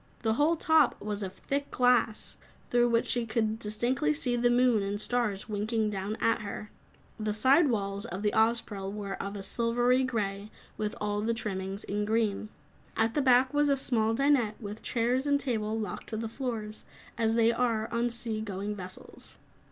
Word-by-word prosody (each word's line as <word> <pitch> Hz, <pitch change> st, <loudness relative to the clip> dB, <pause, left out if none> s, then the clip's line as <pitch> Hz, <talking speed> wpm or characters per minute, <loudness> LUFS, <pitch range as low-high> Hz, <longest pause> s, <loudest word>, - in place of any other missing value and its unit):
The 220 Hz, -1 st, +2 dB
whole 295 Hz, +7 st, +3 dB
top 315 Hz, -4 st, +3 dB
was 210 Hz, 0 st, -4 dB
of 190 Hz, -2 st, -3 dB
thick 280 Hz, +6 st, -3 dB
glass, 245 Hz, -3 st, +2 dB, 0.3 s
through 240 Hz, 0 st, +4 dB
which 230 Hz, 0 st, +2 dB
she 240 Hz, -2 st, -1 dB
could 220 Hz, -1 st, 0 dB
distinctly 215 Hz, -, 0 dB
see 240 Hz, +11 st, -1 dB
the 240 Hz, 0 st, +3 dB
moon 245 Hz, -2 st, +4 dB
and 200 Hz, +1 st, -2 dB
stars 215 Hz, -4 st, -1 dB
winking 215 Hz, +1 st, -1 dB
down 200 Hz, +2 st, -3 dB
at 230 Hz, 0 st, +2 dB
her. 210 Hz, 0 st, -6 dB, 0.5 s
The 215 Hz, -1 st, -1 dB
side 270 Hz, +8 st, +5 dB
walls 200 Hz, -3 st, -2 dB
of 190 Hz, +4 st, -5 dB
the 210 Hz, -, +1 dB
Ozpril 220 Hz, -3 st, +1 dB
were 200 Hz, -1 st, -5 dB
of 200 Hz, +1 st, -5 dB
a 200 Hz, -, -6 dB
silvery 240 Hz, +4 st, +2 dB
grey, 210 Hz, -5 st, -2 dB, 0.3 s
with 210 Hz, -1 st, -3 dB
all 205 Hz, 0 st, -1 dB
trimmings 195 Hz, -2 st, -3 dB
in 205 Hz, +1 st, -2 dB
green. 215 Hz, -1 st, 0 dB, 0.5 s
At 225 Hz, +1 st, +2 dB
the 295 Hz, -, +1 dB
back 255 Hz, 0 st, +4 dB
was 290 Hz, 0 st, +3 dB
a 280 Hz, -, +3 dB
small 225 Hz, -4 st, +2 dB
dinette, 265 Hz, -5 st, +2 dB
with 210 Hz, 0 st, -7 dB
chairs 250 Hz, +4 st, 0 dB
and 285 Hz, 0 st, +3 dB
table 220 Hz, -5 st, -1 dB
locked 215 Hz, -, -5 dB
to 220 Hz, -, -3 dB
the 225 Hz, +1 st, -3 dB
floors 220 Hz, -3 st, -5 dB, 0.3 s
as 225 Hz, 0 st, +1 dB
they 230 Hz, 0 st, +4 dB
are 230 Hz, -2 st, 0 dB
on 235 Hz, +1 st, +1 dB
sea 230 Hz, -2 st, -3 dB
going 205 Hz, 0 st, -4 dB
vessels. 185 Hz, -2 st, -10 dB
225 Hz, 180 wpm, -29 LUFS, 210-245 Hz, 0.5 s, side